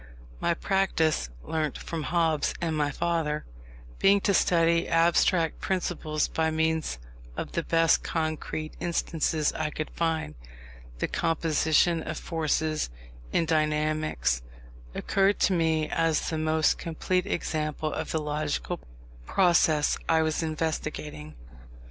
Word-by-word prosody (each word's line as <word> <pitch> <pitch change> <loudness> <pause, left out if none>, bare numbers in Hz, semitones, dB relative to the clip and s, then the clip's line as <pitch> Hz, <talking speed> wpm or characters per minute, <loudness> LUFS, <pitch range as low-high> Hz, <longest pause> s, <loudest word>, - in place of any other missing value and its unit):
My 170 - +1
practice 165 - +1
(learnt 155 -3 -2
from 165 -2 -5
Hobbes 160 -2 +1
and 165 -2 -1
my 150 -1 +1
father) 150 0 -1 0.5
being 200 +1 +5
to 200 - +2
study 170 -2 +3
abstract 165 0 +3
principles 170 -5 -1
by 160 0 0
means 160 - 0 0.4
of - - -4
the 170 - -1
best 165 0 +3
concrete 155 -1 -3
instances 165 -2 0
I 155 -1 -2
could 155 0 -5
find, 160 - -1 0.6
the - - -1
Composition 165 0 +2
of 155 0 -5
Forces, 155 - -1 0.4
in 165 - +2
dynamics, 155 - +1 0.5
occurred 195 +1 +2
to 195 - +4
me 160 -2 +1
as 165 -2 +1
the 160 - -1
most 155 0 +2
complete 180 +3 -1
example 155 -4 -2
of - - -4
the 160 - 0
logical 150 - -2 0.5
process 170 -5 +3
I 160 0 +4
was 155 +1 0
investigating. 155 - -3
160 Hz, 120 wpm, -27 LUFS, 155-165 Hz, 0.6 s, being